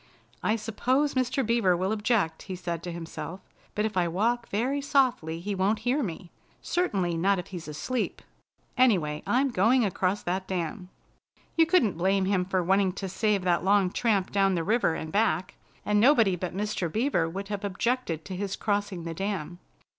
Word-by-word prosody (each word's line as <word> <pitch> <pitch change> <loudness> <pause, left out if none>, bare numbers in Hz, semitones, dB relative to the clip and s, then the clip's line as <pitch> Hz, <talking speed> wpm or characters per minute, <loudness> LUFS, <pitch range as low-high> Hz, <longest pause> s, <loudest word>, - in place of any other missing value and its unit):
"I 215 - +1
suppose 250 +6 0
Mr. 255 0 0
Beaver 215 -6 +2
will 190 +3 -1
object," 210 -7 0
he 185 - -3
said 175 -2 -4
to 175 +1 -5
himself, 170 +2 -6 0.4
"but 210 - +1
if 220 - -3
I 180 -2 +2
walk 230 +7 0
very 255 +7 0
softly 255 - +1
he 200 +4 -3
won't 195 +3 +1
hear 260 +5 +2
me. 175 - -5 0.3
Certainly 190 - 0
not 195 +4 +2
if 180 - -6
he's 175 -4 -7
asleep. 225 +11 -3 0.5
Anyway, 180 -13 +2
I'm 270 +3 +2
going 235 +4 +3
across 190 +1 -1
that 185 +2 -2
dam." 180 +1 -4 0.7
You 325 -1 +4
couldn't 235 - +2
blame 190 +2 +2
him 190 -2 +1
for 185 -1 0
wanting 190 +1 +2
to 195 0 -5
save 200 +1 0
that 175 -2 +1
long 195 -1 +3
tramp 200 -5 +1
down 195 -1 +2
the 165 - -1
river 215 -4 +2
and 160 0 -5
back, 210 -2 +1 0.3
and 210 0 +2
nobody 230 -6 +5
but 180 +1 -5
Mr. 205 -5 -2
Beaver 215 - +1
would 195 +4 -6
have 205 -1 -4
objected 200 -4 -1
to 190 - -6
his 195 +1 -3
crossing 205 -4 -2
the 165 0 -4
dam. 180 -2 -4
195 Hz, 180 wpm, -27 LUFS, 180-225 Hz, 0.7 s, nobody